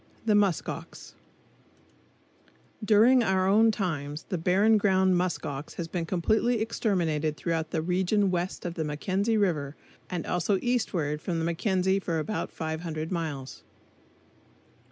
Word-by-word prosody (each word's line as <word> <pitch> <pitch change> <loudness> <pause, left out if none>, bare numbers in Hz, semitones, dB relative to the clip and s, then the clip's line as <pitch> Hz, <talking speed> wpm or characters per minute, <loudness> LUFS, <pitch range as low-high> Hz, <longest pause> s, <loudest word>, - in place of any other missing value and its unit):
The 215 - +3
Musk 200 -4 +2
Ox - - -8 1.7
During 225 +5 +5
our 190 -4 +2
own 220 +3 +5
times, 155 -8 -3
the 185 - -1
Barren 200 +6 +3
Ground 190 -2 +3
musk 180 0 -1
ox 140 +1 -6
has 170 - -4
been 165 -1 -3
completely 220 +7 +1
exterminated 165 -9 -1
throughout 165 -2 -2
the 160 - -2
region 190 +3 +1
west 180 +1 -3
of 175 - -3
the 165 - -3
Mackenzie 190 +9 -1
River, 155 -8 0 0.3
and 180 -3 -3
also 180 +3 0
eastward 175 -12 -1
from 175 -1 -2
the 165 - -1
Mackenzie 190 +2 +1
for 170 -4 -2
about 205 +7 -3
500 160 0 -4
miles. 150 -6 -4
180 Hz, 135 wpm, -27 LUFS, 160-205 Hz, 1.7 s, During